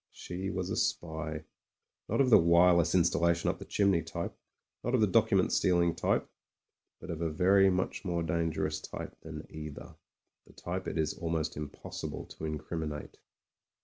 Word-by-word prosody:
She 95 +2 -5
was 95 -1 -3
a - - 0
spy, 80 -2 -2 0.7
not - - +2
of 130 -2 +3
the - - +9
wireless 85 0 +5
installa 85 -1 +3
tion 85 - 0
up - - -10
the - - -8
chimney 100 -4 +2
type, 80 +2 -5 0.5
not 120 +2 +1
of 120 - +3
the - - +6
document 95 - +3
steal 90 -1 +3
ing 85 -1 +3
type, - - 0 0.7
but 90 - -7
of 85 -1 -5
a 85 - 0
very 95 +4 +4
much 90 0 -1
more 85 -3 -1
dangerous 80 -1 -1
type - - -7
than 80 -1 -8
either, 75 -2 -8 0.5
the - - -17
type 95 +2 -5
it - - -3
is 80 -1 +1
almost 80 -2 -2
impossible 75 -1 -6
to 80 - -7
incrim 80 +2 -4
inate. 75 -1 -6
85 Hz, 175 wpm, -31 LUFS, 80-90 Hz, 0.7 s, the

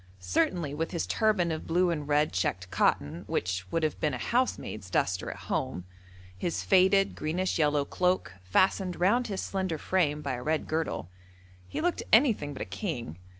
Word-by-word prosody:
Certainly 140 - 0
with 160 +2 -2
his 170 - -1
turban 210 -6 +2
of 160 - -4
blue 175 +2 +2
and 150 -3 -3
red 150 -3 +2
checked 90 0 -1
cotton 85 -4 +1
(which 95 +1 -2
would 165 - 0
have 155 - -1
been 150 - 0
a - - -3
housemaid's 235 - -1
duster 90 0 0
at - - -7
home), 90 - -2 0.5
his 160 - -2
faded, 195 +1 +4
greenish 175 +4 -1
yellow 150 -2 +2
cloak, 180 +3 0
fastened 185 - +1
round 235 +8 +3
his 195 -3 -3
slender 190 -4 -2
frame 150 -3 0
by 140 - -2
a 125 - -4
red 155 +4 0
girdle, 155 - -2 0.6
he - - -4
looked 350 +1 0
anything 220 - +4
but 135 - -5
a - - -6
king. 120 - -5
160 Hz, 175 wpm, -29 LUFS, 120-185 Hz, 0.6 s, faded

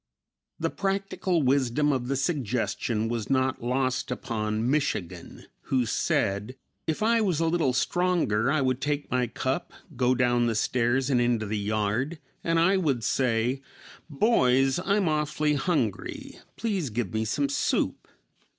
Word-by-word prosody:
The - - -1
practical 195 -3 -1
wisdom 135 +2 +2
of 130 -3 -1
the 135 - 0
suggestion 125 - -1
was 115 -2 -3
not 130 -1 +1
lost 130 +2 0
upon 110 -3 -2
"Michigan," 135 - -2 0.2
who 130 -2 +1
said, 105 +2 0 0.3
"If 160 +6 -1
I 230 +1 +3
was 185 -7 +1
a 165 - +2
little 160 -5 +2
stronger 140 -6 +1
I 155 -1 +2
would 130 0 0
take 145 0 -2
my 125 -1 +1
cup, 130 +8 -3 0.2
go 125 +1 +2
down 120 -1 +2
the 115 - 0
stairs 125 +4 +1
and 125 -2 +3
into 120 -2 +1
the 105 +1 -3
yard 110 +9 -1 0.3
and 165 0 +1
I 185 +4 +4
would 140 -10 0
say, 120 +2 +1 0.5
'Boys, 135 - +3
I'm 200 -1 +2
awfully 150 -1 +1
hungry; 140 - -2 0.2
please 195 - -1
give 110 -3 -3
me 110 0 0
some 140 +6 0
soup.'" 140 - -1
130 Hz, 145 wpm, -27 LUFS, 120-155 Hz, 0.5 s, I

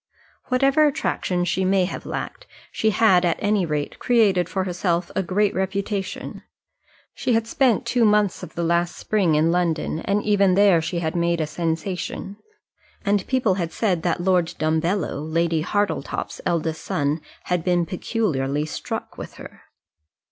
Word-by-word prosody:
Whatever 275 +4 +3
attractions 180 - -1
she 190 - 0
may 190 0 +3
have 180 - -6
lacked, - - -5 0.2
she 220 - +1
had 200 -4 +4
at 170 -2 +2
any 205 -3 +1
rate 150 -1 -3
created 205 -8 +3
for 190 +2 -1
herself 175 -1 -1
a - - +2
great 200 +3 +1
reputation. 195 +1 -3 0.7
She 250 - -1
had 225 0 +2
spent 240 0 +2
two 245 -2 +1
months 210 -3 +3
of 165 - -9
the 170 - -2
last 170 +1 +1
spring 190 -7 +1
in 160 +2 +3
London, 170 -3 0
and 200 +4 0
even 200 -3 +3
there 195 -4 +5
she 170 +2 -3
had 160 +1 -2
made 170 0 +1
a 155 - +1
sensation; 175 +5 -3 0.7
and 200 -1 +1
people 255 -7 +2
had 170 -1 -3
said 185 -7 0
that 175 0 -1
Lord 180 -3 +1
Dumbello, 160 +1 0
Lady 165 0 0
Hartletop's 205 +4 -2
eldest 160 -1 -1
son, 145 +2 -1 0.2
had 180 -2 -1
been 175 -1 +2
peculiarly 150 - -1
struck 155 - -6
with - - -8
her. - - -12
180 Hz, 155 wpm, -23 LUFS, 165-205 Hz, 0.7 s, there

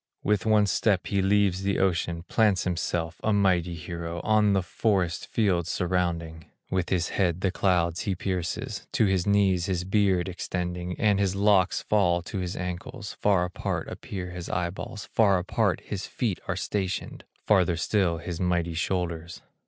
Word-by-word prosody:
With 105 0 +1
one 105 -1 +5
step 100 -1 +1
he 100 -1 0
leaves 95 -1 +2
the 100 0 0
ocean, 85 -3 0
Plants 105 -1 +2
himself, 85 -2 -2
a 110 - +2
mighty 90 -4 +2
hero, 85 +1 -5
On 105 -2 +3
the 95 -2 +2
forest 90 -4 0
fields 90 -6 +1
surrounding; 85 -3 -1 0.3
With 95 -2 0
his 90 -3 0
head 90 -2 0
the 95 - +1
clouds 85 -3 +1
he 100 - -1
pierces, 90 -2 -3
To 110 - +3
his 95 -2 +1
knees 95 -3 +3
his 90 -2 -1
beard 95 -2 +2
extending, 90 -1 -4
And 105 -3 +3
his 100 -1 +1
locks 100 -2 +3
fall 90 -5 +2
to 95 - -5
his 90 -1 -3
ankles; 100 +5 -5
Far 95 -4 +3
apart 90 - -3
appear 90 -2 -6
his 90 -1 -7
eyeballs, 90 +4 -3
Far 100 -4 +3
apart 90 +1 0
his - - -5
feet - - -2
are - - -1
stationed, 95 -2 -3 0.2
Farther 90 -5 +3
still 85 -1 +1
his 85 +1 -5
mighty 85 -2 0
shoulders. 85 0 -3
90 Hz, 160 wpm, -27 LUFS, 85-100 Hz, 0.3 s, one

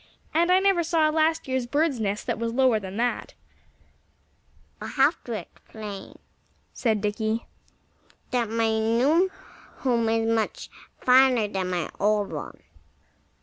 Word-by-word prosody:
And 340 +3 +3
I 365 - +6
never 385 -2 +3
saw 325 -1 +2
a - - +1
last 320 0 +1
year's 260 -2 -1
bird's 290 -1 +1
nest 205 -1 -2
that - - -2
was 230 0 -2
lower 255 -4 +4
than 195 0 -7
that." 240 +1 -2 1.5
"I - - -5
shall 270 - +2
have 305 - -1
to 240 - -4
explain," 205 0 -8 0.6
said 220 -4 0
Dickie, 220 +2 -1 0.9
"that 240 -3 0
my 225 -1 +1
new 265 +12 +3 0.5
home 235 -4 +2
is 225 0 +1
much 225 -1 -1 0.3
finer 255 -3 +5
than 190 -2 -3
my 175 -3 -2
old 205 0 +1
one. - - -7
230 Hz, 145 wpm, -25 LUFS, 215-280 Hz, 1.5 s, I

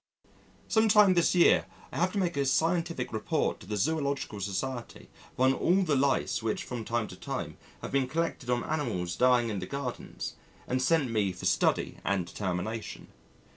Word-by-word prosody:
Some 220 -1 +3
time 205 -2 +7
this 175 0 +3
year 175 - +5 0.2
I - - -6
have 180 +2 +2
to - - -2
make 180 -3 0
a 140 - +1
scientific 165 -1 0
Report 110 - -1
to - - -13
the 105 0 -2
Zoological 140 -4 -1
Society 115 +6 -4 0.2
upon 130 +1 +3
all 180 +8 +2
the 155 -5 +1
Lice 135 -2 +1
which 110 -1 -2
from 120 -3 -5
time 115 -1 -1
to - - -9
time - - -5 0.3
have - - -5
been 135 -2 +1
collected 155 -3 -2
on 120 -1 +1
animals 90 - -2
dying 125 -2 +3
in 105 -3 -2
the 90 - -5
gardens 140 -3 -5 0.3
and 130 +1 0
sent 140 -2 +2
me 105 -4 +1
for 90 - -8
study - - +1
and 95 -3 0
determination. 100 +4 -4
130 Hz, 175 wpm, -29 LUFS, 110-160 Hz, 0.3 s, time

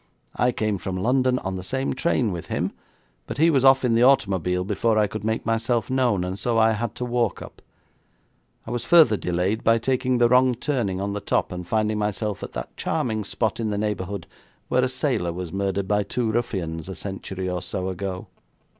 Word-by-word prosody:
I 125 - +2
came 105 -4 -1
from 95 +1 -4
London 125 +5 +2
on 95 -5 -4
the 90 - -6
same 130 +7 -2
train 130 -5 +1
with 85 -2 -6
him, - - -1 0.6
but - - -5
he 165 +3 +5
was 135 -4 +2
off 135 -1 +6
in 120 - +2
the 115 - +3
automobile 95 - +3
before 110 +3 +1
I 105 - +4
could 105 0 -6
make 110 +1 -1
myself 115 0 0
known, 125 -8 +2
and 95 +2 -4
so 120 0 0
I 110 0 +5
had 110 0 -3
to 125 - -3
walk 120 -3 0
up. - - -13 1.0
I 110 - -6
was 120 -1 -2
further 160 -11 +6
delayed 90 +4 -1
by 115 +1 +4
taking 130 +1 0
the 120 0 +5
wrong 125 +1 +4
turning 115 -8 -1
on 100 +1 -2
the 105 - -2
top 100 - 0
and 90 -1 -6
finding 110 0 0
myself 105 -1 -2
at - - -7
that - - -6
charming 110 -3 -1
spot 110 +2 -2
in 110 -2 -1
the 105 - -2
neighbourhood 100 -3 -3 0.4
where 125 - +3
a 130 - +1
sailor 130 - 0
was 85 -1 -6
murdered 100 0 -1
by 105 +1 +2
two 115 +2 -1
ruffians 95 -8 -2
a 95 - -5
century 95 -1 -5
or 90 -1 -2
so 95 0 -3
ago.' 95 0 -4
110 Hz, 210 wpm, -24 LUFS, 95-125 Hz, 1.0 s, off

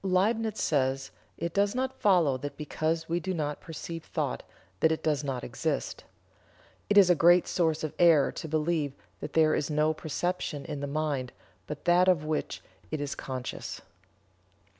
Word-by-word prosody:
Liebnitz 215 +4 +1
says: 135 -2 0 0.3
"It 170 0 -3
does 200 +3 +2
not 260 +1 -2
follow 175 -9 +4
that 140 +2 -6
because 160 +2 -2
we 170 +1 0
do 185 +2 -3
not 150 -2 -3
perceive 165 +1 -7
thought 60 - -3 0.4
that 160 - +4
it 160 - -2
does 150 -2 +1
not 135 -3 -3
exist. - - -3 0.8
It 205 - +3
is 190 -3 +8
a - - +7
great 175 +2 +5
source 160 -3 0
of 155 - -3
error 165 -5 +5
to - - -6
believe 155 -2 0 0.3
that - - -7
there 155 -1 +4
is 150 - 0
no 155 +1 +2
perception 155 -1 -3
in 150 -3 -5
the 145 - -3
mind 140 -4 -2 0.4
but 150 -1 -7
that 175 +1 +5
of 170 -5 +3
which 155 0 -3 0.3
it 155 - -3
is 145 -1 -3
conscious." 130 -2 -6
155 Hz, 170 wpm, -29 LUFS, 145-175 Hz, 0.8 s, is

